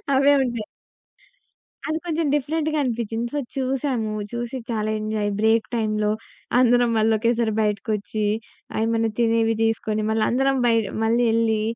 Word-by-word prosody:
అవే 275 +2 +5
ఉంటాయి. 235 -4 -3 1.2
అది 315 0 -1
కొంచెం 330 -1 0
డిఫరెంట్‌గా 305 +2 0
అనిపిచింది. 235 -1 -2
సో, 290 - 0 0.2
చూసాము 260 -4 -1 0.2
చూసి 240 +1 -4
చాలా 215 -1 -1
ఎంజాయ్ 215 -1 -1
బ్రేక్ 220 +1 +3
టైమ్‌లో. 215 -2 0 0.5
అందరం 245 -1 +4
మళ్ళొక్కేసారి 225 +1 +2
బయటకొచ్చి 210 +1 -1 0.6
ఏమైనా 225 0 +1
తినేవి 225 -1 +2
తీసుకొని 220 -1 0
మళ్ళందరం 250 +5 +2
బయట 230 -2 +3 0.2
మళ్ళి 230 +2 +2
యేలి. 225 -1 +2
230 Hz, 115 wpm, -23 LUFS, 220-250 Hz, 1.2 s, అవే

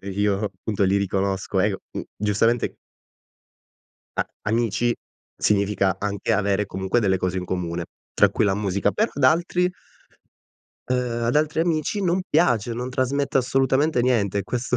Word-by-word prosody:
io, 100 +1 0
punto, 105 -2 -1
li 95 +1 +3
riconosco, 95 0 0
eh, 105 +3 +3
c 95 - -3 0.2
mhmm, - - -2
giustamente 105 +3 +1 1.4
a - - 0 0.2
amici 115 +2 +1 0.4
significa 100 -2 +1
anche 100 +2 -1
avere 100 -1 +1
comunque 95 +5 0
delle 95 -4 +2
cose 90 0 -1
in 90 - -4
comune 85 -2 -3 0.3
tra - - +5
cui - - 0
la 100 -2 +2
musica. 100 -1 0
Però 220 +2 +1
ad 140 - -1
altri 175 +4 +3 1.2
ehm, 125 -2 -1
ad 120 +5 +1
altri 155 +1 +1
amici 165 +4 0
non 180 +1 +1
piace, 120 - +2
non 125 +2 -4
trasmette 135 +2 0
assolutamente 135 +1 +2
niente, 100 -6 +1
questo 125 +4 -2
110 Hz, 145 wpm, -23 LUFS, 100-130 Hz, 1.4 s, tra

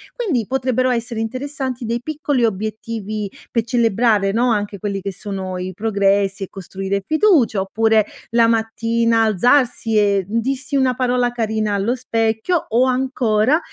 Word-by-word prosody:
Quindi, 310 - -1
potrebbero 255 -1 0
essere 235 -1 -2
interessanti 260 +2 -4
dei 230 +1 -2
piccoli 290 -3 0
obiettivi 215 0 -4 0.2
pe 230 - +1
celebrare, 225 -3 +2
no, 240 +3 +2
anche 205 -2 -2
quelli 195 -1 -3
che 195 +1 -4
sono 190 -2 -5
i 185 +1 -5
progressi 200 -1 +1
e - - -4
costruire 195 +1 -4
fiducia, 315 - +3
oppure 220 +2 +2 0.3
la 230 -1 +4
mattina 230 0 +1
alzarsi, 230 +1 +2
e 200 -2 +3
d 225 +3 0
dirsi 270 +3 -3
una 260 -2 +2
parola 245 -1 +1
carina 220 -3 -1
allo 200 +5 0
specchio, 230 +6 0
o 240 +3 +3
ancora 255 0 +1
225 Hz, 145 wpm, -19 LUFS, 205-250 Hz, 0.3 s, la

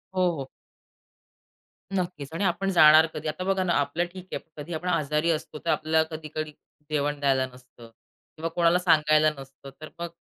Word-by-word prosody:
हो, 185 -1 +3
हो. 135 - -4 1.5
नक्कीच. 175 -7 -3
आणि 180 - -2
आपण 190 +1 0
जाणार 155 -2 +7
कधी 155 0 -5
आता 155 +4 -3
बघा 190 0 +1
ना 175 -2 +1
आपलं 145 +5 0
ठीक 185 -1 -10
आहे, - - -2 0.2
कधी 150 +3 -6
आपण 180 +3 -4
आजारी 155 -1 +1
असतो 155 -1 -4
तर - - -1
आपल्याला 160 0 +2
कधी-कधी 155 0 -5 0.4
जेवण 145 -1 -1
द्यायला 135 -2 +2
नसतं. 125 -2 -16 0.5
किंवा 165 +1 -3
कोणाला 175 0 +4
सांगायला 155 -3 +4
नसतं, 135 0 -12
तर 155 - -8
मग 170 0 -4
155 Hz, 170 wpm, -26 LUFS, 150-175 Hz, 1.5 s, जाणार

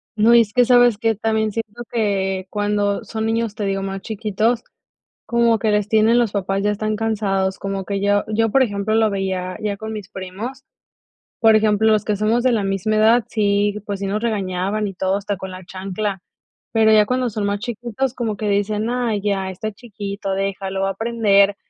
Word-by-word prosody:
No, 225 +2 +5
es 230 -3 +5
que, 245 +1 +4
¿sabes 245 -2 +5
qué? 225 +1 +1
También 220 0 0
siento 225 +2 -5
que 195 -4 -1
cuando 205 -1 0
son 220 0 -3
niños, 225 -1 0
te 210 - -4
digo, 195 0 -1
más 195 0 -4
chiquitos, 220 +2 -1 0.6
como 235 -1 +2
que 215 +1 0
les 210 -1 +1
tienen, 220 +1 +4
los 230 -4 +1
papás 195 0 -1
ya 210 - +2
están 215 +1 -1
cansados, 200 -4 -1
como 195 -1 -4
que 200 +1 -3
yo 205 0 +2
yo, 225 0 +2
por 270 +4 +4
ejemplo, 205 -2 -1
lo 220 0 +4
veía 190 -2 -2
ya 205 -1 -1
con 220 +1 -6
mis 205 -3 -8
primos. 210 +9 -7 0.7
Por 225 -1 +5
ejemplo, 215 0 +3
los 215 - +2
que 210 - +1
somos 220 +4 +1
de 255 - +3
la 215 -4 +1
misma 195 +2 0
edad, 220 +2 +4
sí, 205 -1 +1
pues 200 -2 -4
sí, 200 - -2
nos 210 +3 -2
regañaban 200 -1 -1
y 195 - -5
todo, 190 +1 0
hasta 200 0 -3
con 190 0 -7
la 185 0 -9
chancla, 195 +1 -4 0.5
pero 220 -1 +4
ya 215 -1 +6
cuando 255 +1 0
son 210 0 -3
más 200 0 -1
chiquitos 240 +2 -3
como 225 -5 -2
que 210 - -2
dicen: 210 +2 0
"Ay, 240 -4 -1
ya, 195 -2 -1
está 205 +4 -4
chiquito, 200 -3 -6
déjalo 195 0 -2
va 195 - +1
a 195 - -1
aprender". 205 -2 +2
210 Hz, 200 wpm, -20 LUFS, 195-225 Hz, 0.7 s, ya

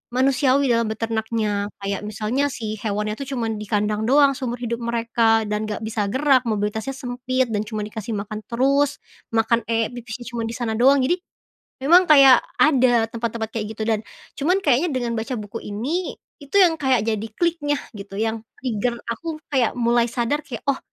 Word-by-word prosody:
manusiawi 270 0 +3
dalam 230 -1 +2
beternaknya, 220 -2 -1 0.2
kayak 195 0 -2
misalnya 220 +6 -1
si 220 -5 -5
hewannya 210 0 -2
tuh 275 - -5
cuman 225 -3 -2
di 210 - -6
kandang 210 0 0
doang 280 +2 +5
seumur 245 -2 -3
hidup 235 -1 -2
mereka 230 -1 +2
dan 210 +1 -1
gak 215 0 -4
bisa 220 -1 -1
gerak, 260 +3 +3
mobilitasnya 215 +4 -2
sempit, 255 0 -2
dan 210 0 -1
cuman 215 -1 -3
dikasih 220 +1 -5
makan 210 +1 -5
terus. 275 +4 +1 0.3
Makan, 225 0 +2
eek, 225 -1 +1
pipisnya 240 0 -7
cuman 230 -1 -3
di 230 - -5
sana 235 -2 -2
doang, 270 +2 +5
jadi 345 +8 +2 0.7
memang 350 +5 +6
kayak 275 -4 +8 0.2
ada 255 -6 +4
tempat-tempat 230 -1 -3
kayak 215 -2 -3
gitu 220 - -5
dan 220 -1 +1 0.4
cuman 360 +7 +1
kayaknya 285 +4 +3
dengan 245 -4 -2
baca 225 +4 -3
buku 210 +1 -6
ini, 270 - -3 0.3
itu 285 +3 -14
yang 355 -4 +6
kayak 260 -5 +2
jadi 220 -1 -1
kliknya 330 -4 +1 0.2
gitu 200 -1 -9
yang 225 0 -1 0.2
trigger 240 -1 -2
aku 315 +7 -4 0.2
kayak 255 -5 +2
mulai 235 0 +3
sadar 240 +5 0
kayak, 235 -5 -7
oh, 270 - -1
235 Hz, 175 wpm, -22 LUFS, 220-265 Hz, 0.7 s, kayak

